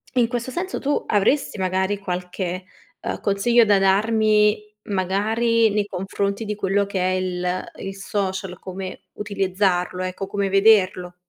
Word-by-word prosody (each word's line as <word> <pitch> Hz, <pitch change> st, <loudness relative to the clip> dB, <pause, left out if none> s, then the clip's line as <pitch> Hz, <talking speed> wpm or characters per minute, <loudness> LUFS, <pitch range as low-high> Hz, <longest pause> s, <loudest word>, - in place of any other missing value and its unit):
in 245 Hz, -2 st, +4 dB
questo 245 Hz, +1 st, -3 dB
senso, 365 Hz, +6 st, -3 dB
tu 290 Hz, +1 st, 0 dB
avresti 215 Hz, +6 st, +1 dB
magari 190 Hz, +1 st, 0 dB
qualche, 180 Hz, -1 st, -4 dB, 0.3 s
ehm, -, -, -4 dB
consiglio 225 Hz, +4 st, +3 dB
da 205 Hz, -2 st, +4 dB
darmi, 210 Hz, +1 st, +3 dB
magari 220 Hz, +4 st, +1 dB
nei 205 Hz, 0 st, +1 dB
confronti 200 Hz, +2 st, -3 dB
di 210 Hz, -, -2 dB
quello 200 Hz, 0 st, +1 dB
che 200 Hz, -1 st, -3 dB
è 185 Hz, +1 st, +1 dB
il 180 Hz, -1 st, -2 dB
il 195 Hz, 0 st, -6 dB
social, 190 Hz, -2 st, -3 dB
come 185 Hz, 0 st, -7 dB
utilizzarlo, 190 Hz, -3 st, -1 dB
ecco 185 Hz, +1 st, -4 dB
come 200 Hz, 0 st, -1 dB
vederlo? 190 Hz, -3 st, +3 dB
195 Hz, 140 wpm, -22 LUFS, 185-210 Hz, 0.3 s, in